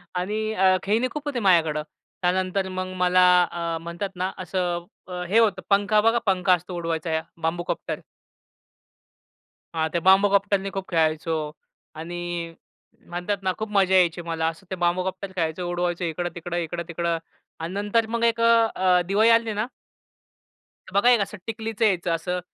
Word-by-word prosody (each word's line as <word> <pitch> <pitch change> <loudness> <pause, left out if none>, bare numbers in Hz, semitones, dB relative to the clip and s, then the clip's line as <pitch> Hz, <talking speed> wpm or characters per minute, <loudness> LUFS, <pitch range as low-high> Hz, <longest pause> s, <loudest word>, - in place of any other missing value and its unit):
आणि 215 +4 -1
अ, 190 -2 +4
खेळणी 220 +6 +1
खूप 300 0 -6
होते 265 -4 -1
माझ्याकडं. 160 -6 +3 0.4
त्यानंतर 185 +1 0
मग 185 0 -4
मला 180 0 +4 0.3
अ, 170 -1 -2
म्हणतात 170 +4 -4
ना, 185 +1 -2
असं 180 -2 -2 0.4
हे 220 +4 +5
होतं, 210 -5 +2
पंखा 205 +1 +3
बघा 230 +2 +3
पंखा 190 -1 +3
असतो 180 +1 -2
उडवायचा 165 -1 -1 0.2
बांबूकॉप्टर. 170 +2 -2 1.8
हां, 160 -1 +1
ते 170 - +1
बांबूकॉप्टरनी 195 0 +4
खूप 195 -1 -4
खेळायचो. 160 -1 +1 0.6
आणि 170 +2 -6 0.9
म्हणतात 180 +4 -2
ना 185 - +2
खूप 220 0 -4
मजा 190 -2 +3
यायची 175 -2 +3
मला 160 -1 0
असं 190 +4 -20
ते 190 - -3
बांबूकॉप्टर 185 +2 -1
खेळायचो. 170 0 -2
उडवायचो 175 0 -1
इकडं-तिकडं, 175 +1 -4
इकडं-तिकडं 170 0 -2 0.4
आणि 165 +2 -5
नंतर 205 +3 +1
मग 235 0 -1
एक 230 0 +2
अ, 230 - +5 0.3
अ, 180 -1 +3
दिवाळी 210 +4 +4
आली 230 -1 +3
ना 210 +2 -1 1.3
बघा 200 +5 +4
एक 245 -2 +5
असं 200 +1 -4
टिकलीच 225 0 -5
यायचं 185 -6 +2
असं, 180 +2 -3
185 Hz, 145 wpm, -24 LUFS, 175-205 Hz, 1.8 s, हे